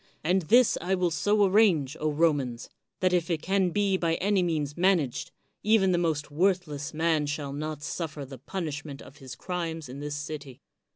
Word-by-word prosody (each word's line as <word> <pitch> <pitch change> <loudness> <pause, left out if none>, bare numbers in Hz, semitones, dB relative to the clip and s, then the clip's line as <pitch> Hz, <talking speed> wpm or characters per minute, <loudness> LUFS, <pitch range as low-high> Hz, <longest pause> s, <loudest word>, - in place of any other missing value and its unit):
And 180 +4 +2
this 235 +9 +4
I 185 +2 0
will 180 -2 0
so 205 +6 +2
arrange, 185 -9 +3
Romans, 145 -6 0 0.3
that 185 -1 +2
if 175 -1 +1
it 165 -3 -1
can 190 -1 +2
be 195 +1 +1
by 165 -2 0
any 200 +1 +1
means 155 -5 -1
managed, 175 -8 +1 0.3
even 210 -3 +3
the 175 - +2
most 155 -4 -1
worthless 160 -3 0
man 160 -2 +1
shall 145 -1 -3
not 150 0 -5
suffer 155 -2 -4
the 135 -1 -10
punishment 145 -2 -5
of 140 - -15
his 130 -4 -9
crimes 165 -1 -4
in 135 +2 -8
this 145 0 -4
city. 145 -3 -7
160 Hz, 175 wpm, -27 LUFS, 145-185 Hz, 0.3 s, this